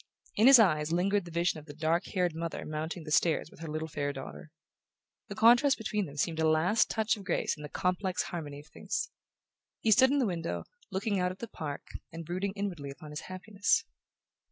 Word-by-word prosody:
In 220 - +5
his 270 -1 +11
eyes 155 -8 +3
lingered 195 +3 +1
the - - -9
vision 170 -1 0
of 150 - -16
the 145 - -9
dark 160 +2 +1
haired 180 -3 0
mother 165 +1 -4
mounting 155 +2 -4
the 155 - -8
stairs 160 0 +2
with - - -17
her 165 - -6
little 155 +1 -3
fair 145 -2 -2
daughter. 135 +2 -9 0.8
The 200 - -7
contrast 240 +5 +5
between 210 -3 -2
them 145 0 -11
seemed 160 +2 -1
a 160 0 +3
last 170 +8 +3
touch 220 +1 +1
of 200 - -9
grace 185 - 0
in 150 - -12
the 150 - -7
complex 180 +2 -1
harmony 145 -4 -6
of - - -21
things. - - -3 0.7
He 225 - +1
stood 260 +5 +7
in 285 - +2
the 265 - +3
window, 170 -4 -3 0.3
looking 200 0 -1
out 180 0 +1
at 185 - -9
the 235 - -6
park, 145 -8 -6 0.3
and 165 0 -7
brooding 185 +4 -2
inwardly 185 -8 -4
upon 150 +2 -10
his 150 - -6
happiness... 200 - 0
175 Hz, 210 wpm, -30 LUFS, 155-200 Hz, 0.8 s, his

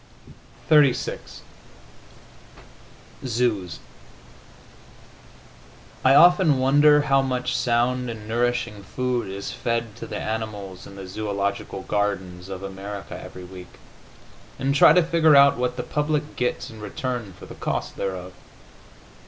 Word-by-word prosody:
XXXVI 145 -5 +4 2.0
ZOOS 110 -9 -1 2.3
I 130 +1 +5
often 175 -3 +6
wonder 145 +3 +5
how 135 -1 +3
much 125 -1 -2
sound 125 +1 +1
and 110 -2 -8
nourishing 120 -2 -1
food 125 +2 -2
is 100 +1 -5
fed 115 -2 -3
to 115 - -8
the - - -5
animals 105 -4 -5
in 100 - -12
the 95 -1 -8
zoological 100 0 -3
gardens 95 -3 -2
of 95 0 -7
America 100 +1 -7
every 90 - -10
week, 90 0 -12 0.8
and 135 +1 0
try 140 - +7
to 175 +2 +5
figure 165 -2 +4
out 140 -2 +6
what 125 0 -2
the 125 - -3
public 150 0 -2
gets 125 -1 -2
in 110 -1 -12
return 120 -2 -4
for - - -11
the - - -10
cost - - -4
thereof. 95 -1 -5
115 Hz, 120 wpm, -24 LUFS, 100-135 Hz, 2.3 s, try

